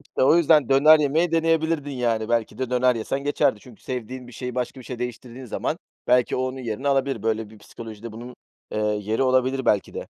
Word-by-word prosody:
İşte, 145 - -4
o 135 +5 +6
yüzden 155 -4 +4
döner 150 +3 +7
yemeyi 160 +4 +1
deneyebilirdin, 160 -2 +1
yani, 115 -4 -1
belki 115 -2 -1
de 130 -1 -3
döner 125 0 +3
yesen 135 +5 -3
geçerdi. 145 -7 +1
Çünkü 120 -2 -16
sevdiğin 125 0 -6
bir 125 - -13
şeyi 125 +1 -6
başka 125 +1 -3
bir 125 - -13
şeye 125 -2 -7
değiştirdiğin 125 +1 -6
zaman 120 - -3 0.3
belki 125 -1 +3
o - - -1
onun 130 +1 -3
yerini 125 +2 -3
alabilir. 135 -4 0
Böyle 110 -1 -1
bir 110 - -15
psikolojide 110 +1 -10
bunun, 120 +2 -9 0.4
eee, - - -2
yeri 105 +2 0
olabilir, 130 0 +1
belki 105 - +1
de. - - -5
125 Hz, 205 wpm, -24 LUFS, 115-135 Hz, 0.4 s, döner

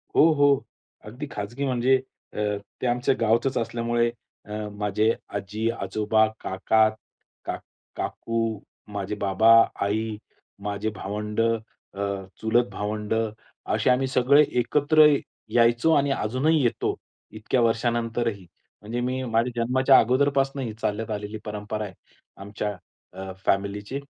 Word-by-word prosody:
हो, - - +7
हो, 145 -3 +3 0.4
अगदी 125 +7 -7
खाजगी 120 +7 -4
म्हणजे 130 0 +3 0.4
अ, - - -11 0.4
ते 125 - 0
आमच्या 125 +1 +2
गावचच 115 +4 +2
असल्यामुळे, 120 0 0 0.4
अ, 105 - -8 0.2
माझे 105 +1 +1 0.3
आजी, 105 +3 -2
आजोबा, 110 +3 +2 0.2
काका, 110 +3 +2 0.6
काक - - -4 0.3
काकू, 115 -2 -2 0.3
माझे 100 +1 -3
बाबा, 100 +3 +4 0.3
आई, 110 +2 -1 0.5
माझे 105 +1 -2
भावंड, 105 +2 -3
अ, 115 -3 -3 0.4
चुलत 120 +2 +2
भावंड 105 +1 -3 0.6
असे - - +2
आम्ही 130 +1 +3
सगळे 135 +3 +5 0.2
एकत्र 150 +5 +5 0.5
यायचो 120 +6 +4
आणि 140 -1 +3
अजूनही 135 +7 +1
येतो, 120 - 0 0.4
इतक्या 110 +3 -1
वर्षानंतरही. 115 -2 0 0.4
म्हणजे 115 +4 -4
मी 130 +1 -1
माझ्या 120 0 0
जन्माच्या 130 +2 +5
अगोदरपासून 135 +2 +2
ही 115 -4 -4
चालत 110 +2 -2
आलेली 105 +1 -4
परंपरा 105 0 -4
आहे. 95 - -9 0.4
अ, - - -13
आमच्या 105 +1 -4 0.7
फॅमिलीची 100 +6 -1
115 Hz, 120 wpm, -25 LUFS, 105-125 Hz, 0.7 s, हो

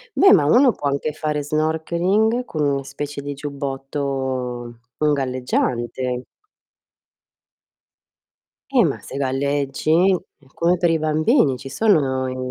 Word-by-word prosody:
beh, 390 - +7
ma 150 -7 +5
uno 245 - +5
può 145 - -3
anche 140 +2 -1
fare 150 -2 -2
snorkeling 170 - 0
con 155 -2 -3
una 140 -1 0
specie 140 +1 -6
di 145 0 -5
giubbotto 135 -4 -4 0.2
un 150 -1 +2
galleggiante. 125 -1 -2 2.5
Eh, 245 -8 +5
ma 145 - -2
se - - -8
galleggi, 140 +2 -1 0.5
è 140 - -26
come 175 +2 +1
per 175 -1 +2
i 165 - +2
bambini, 155 - +2
ci 135 - -10
sono 135 -8 +1
i 130 - -5
145 Hz, 125 wpm, -21 LUFS, 135-155 Hz, 2.5 s, beh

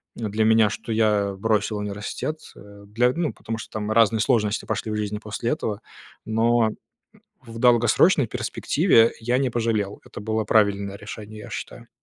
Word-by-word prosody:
для 110 -1 -1
меня, 110 -1 +5
что 110 +2 -6
я 105 -2 +2
бросил 105 0 0
университет, 105 +9 -4 0.2
э, 100 0 -14
для, 120 +4 +2
ну 165 -1 -2
потому 115 0 -6
что 110 - -9
там 110 0 -3
разные 110 0 +4
сложности 110 -3 +1
пошли - - -3
в - - -2
жизни 105 -1 -2
после 110 +2 -4
этого, 110 -9 -3 0.4
но 115 +1 +2 0.7
в 115 -1 -10
долгосрочной 120 +5 +4
перспективе 115 - +2
я 120 +3 +1
не 135 -1 +1
пожалел. 110 -4 -1
Это - - -10
было 110 +1 -1
правильное 100 -2 +2
решение, 105 0 -9
я - - -10
считаю. - - -8
110 Hz, 160 wpm, -23 LUFS, 105-115 Hz, 0.7 s, меня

